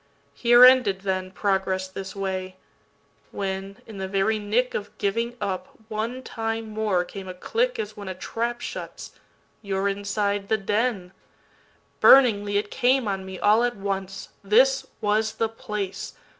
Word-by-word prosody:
Here 240 - +7
ended, 250 -7 +5
then, 185 -1 -2
Progress 190 -1 -1
this 190 +1 -8
way. 190 -1 -3 0.7
When, 195 0 -4
in 215 -3 -10
the 190 - -3
very 200 +3 +1
nickOf 210 0 -1
giving 230 +4 -1
up, 195 -3 -4
one 230 +4 -3
time 225 -2 -4
more, 210 -4 0
came 190 +1 -9
a 185 - -7
clickAs 450 - -1
when 205 -2 -10
a 185 - -4
trap 235 +5 -3
shuts—you 200 -2 -8
're 195 +1 +1
inside 200 0 -1
the 220 - +3
den. 205 -2 -1 0.9
Burningly 205 -6 +6
it 205 0 -2
came 255 -1 +2
on 190 -1 -3
me 190 0 -7
all 215 +4 +4
at 245 0 0
once, 195 -1 -4
This 255 +7 +4
was 215 +1 +1
the 225 - 0
place! 210 -3 -5
205 Hz, 145 wpm, -25 LUFS, 195-225 Hz, 0.9 s, Here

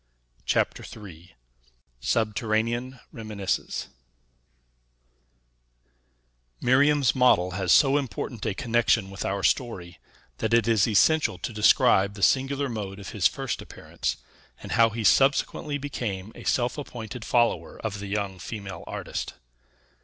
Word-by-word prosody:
CHAPTER - - +1 0.2
III 90 0 -14 0.6
SUBTERRANEAN 115 - -1
REMINISCENCES 105 -4 -3 2.7
Miriam's 140 +2 +3
model 110 -8 +3
has 90 -1 -1
so 140 0 +5
important 120 -2 -5
a 100 - -1
connection 115 -2 +1
with 95 - -5
our 100 0 -2
story, 90 -4 -1 0.4
that 110 +1 +2
it 115 -1 +2
is 110 -4 +3
essential 130 - +3
to 110 - -5
describe 100 -2 +4
the 100 - -6
singular 140 +1 +2
mode 105 -5 -5
of 100 - -8
his - - +3
first - - -4
appearance, 65 - -5 0.4
and - - -9
how 115 0 +5
he 110 +1 -4
subsequently 140 +4 +2
became 110 -8 -5
a - - -12
self 125 +3 0
appointed 120 -4 -7
follower 120 0 0
of 105 -2 -3
the 100 - -6
young 100 -2 -3
female 100 +1 -7
artist. - - -5
110 Hz, 125 wpm, -26 LUFS, 100-125 Hz, 2.7 s, so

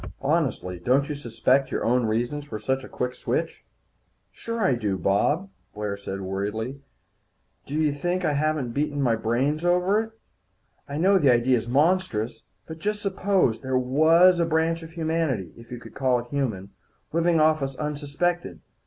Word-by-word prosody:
Honestly, 135 - 0
don't 135 - +2
you - - -1
suspect 130 0 +1
your - - -2
own 120 0 +2
reasons 120 +7 -1
for 145 -7 -6
such 130 +4 -1
a - - -10
quick 125 0 -3
switch?" - - -3 0.7
"Sure 230 -1 -4
I 140 - +3
do, 105 -5 -1
Bob," 145 - +1 0.2
Blair 105 -1 -3
said 100 -1 -6
worriedly. 105 +8 -4 0.9
"Do 145 - -5
you 155 -2 +2
think 175 +5 -1
I 150 - +2
haven't 150 -4 0
beaten 145 +3 -1
out 140 - +1
my 120 -3 +3
brains 130 +8 0
over 180 +4 +3
it? 225 0 -7 0.8
I 140 - -4
know 190 +4 +4
the 140 -6 +5
idea's 120 -1 +2
monstrous. 145 -4 +1 0.2
But 160 0 -9
just 210 +4 -2
suppose 190 - +1
there 130 -1 0
was 160 +8 +5
a 170 - +3
branch 165 +1 +1
of 165 0 -11
humanity 160 - -1
if 115 0 -15
you 125 - -6
could - - -13
call 130 -2 +2
it 120 0 -6
human 110 -9 -2 0.4
living 170 0 +3
off 155 0 +3
us 135 -1 -3
unsuspected. 150 +4 -2
140 Hz, 170 wpm, -25 LUFS, 120-165 Hz, 0.9 s, the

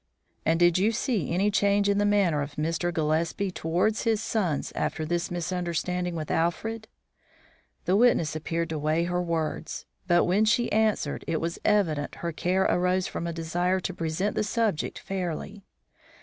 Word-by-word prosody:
"And 165 +1 +3
did 175 0 +4
you 210 +4 +3
see 225 - -1
any 195 +5 +2
change 200 0 +3
in 200 0 +2
the 205 - +3
manner 190 -7 +3
of 145 +1 -5
Mr. 165 +3 -1
Gillespie 165 +4 0
towards 180 +6 0
his 225 -2 +1
sons 195 -9 -1
after 155 - -2
this 175 +2 -1
misunderstanding 175 0 -2
with 155 -2 -4
Alfred?" 220 +7 -1 1.0
The 185 - +3
witness 205 -9 +3
appeared 165 +2 -2
to 155 -1 -3
weigh 155 +3 +1
her 180 +1 0
words; 165 -2 -3 0.2
but, 175 -1 +4
when 200 +5 +3
she 240 +2 +2
answered, 215 -9 +1
it 160 - 0
was 170 +1 -3
evident 160 -9 +1
her 170 - -3
care 180 +4 +1
arose 180 +1 +2
from 170 - -4
a - - -2
desire 175 +3 0
to 185 - -3
present 165 +5 -1
the - - 0
subject 215 -5 -1
fairly. 195 +1 -4
175 Hz, 165 wpm, -27 LUFS, 165-200 Hz, 1.0 s, did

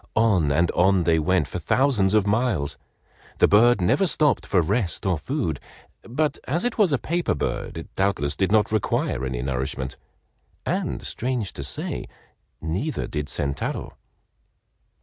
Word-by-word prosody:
On 100 -10 +3
and 85 +4 +2
on 95 0 +3
they 80 -1 +3
went 85 -1 +1
for - - -5
thousands 110 -8 +2
of 105 -2 +3
miles. 105 - 0 0.6
The - - +5
bird 120 +3 +5
never 135 - +3
stopped 150 -6 +2
for 95 - +3
rest 95 +2 0
or 95 -2 +2
food, 85 - -2 0.4
but 150 +6 -1
as 165 +7 0
it 245 -2 -2
was 195 -6 +4
a 140 - +3
paper 170 - -1
bird 75 - -3
it 80 - -9
doubtless 85 -7 0
did 95 +2 0
not 105 0 +3
require 95 - 0
any 65 -2 -3
nourishment, 65 0 -3 0.7
and - - -2
strange 120 -5 -2
to 70 - -6
say, 65 - -2 0.5
neither 95 - -2
did 75 -1 -4
Sentaro. 70 -1 -3
95 Hz, 150 wpm, -24 LUFS, 80-125 Hz, 0.7 s, The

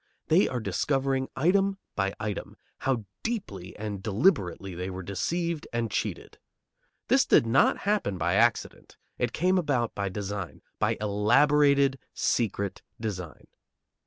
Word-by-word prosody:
They 170 +5 +5
are 125 - -2
discovering 135 +2 0
item 195 +3 +2 0.2
by 100 0 -1
item 105 -2 -5 0.2
how 125 -5 -1 0.2
deeply 105 - -4
and 105 -2 -5
deliberately 100 - +1
they 90 +2 -4
were 95 0 -6
deceived 165 - -2
and 115 -2 -2
cheated. - - -4 0.7
This - - +5
did - - +4
not 115 - +4
happen 200 - 0
by 85 +1 0
accident; 115 +3 +1 0.2
it 125 -1 0
came 185 +7 +2
about 130 -8 0
by 100 -1 -2
design, 100 -1 -5 0.2
by - - +1
elaborated, 135 +6 +3 0.2
secret 100 -4 -1 0.2
design. 95 -8 -5
115 Hz, 130 wpm, -27 LUFS, 100-145 Hz, 0.7 s, They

